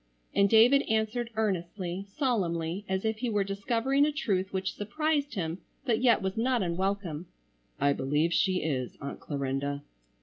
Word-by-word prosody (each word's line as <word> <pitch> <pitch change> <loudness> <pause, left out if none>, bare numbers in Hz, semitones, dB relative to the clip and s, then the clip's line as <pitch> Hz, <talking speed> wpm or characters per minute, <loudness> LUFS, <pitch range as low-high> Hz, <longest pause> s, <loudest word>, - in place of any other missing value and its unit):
and 200 0 +4
David 235 +6 +7
answered 220 +2 0
earnestly, 185 -3 -2
solemnly, 185 - 0
as 190 +2 -1
if 220 0 0
he 245 0 -1
were 205 -2 +2
discovering 230 +8 +1
a 300 - +3
truth 195 -10 -1
which 190 0 -2
surprised 290 +5 -1
him 170 -2 -2 0.3
but 235 -3 +1
yet 235 -5 +4
was 190 0 -1
not 240 -1 +2
unwelcome. 180 -2 -2 0.5
"I 140 0 +3
believe 150 +5 +1
she 185 0 +2
is, 130 -5 -2
Aunt 140 - -6
Clarinda." 140 0 -2
195 Hz, 155 wpm, -29 LUFS, 170-230 Hz, 0.5 s, David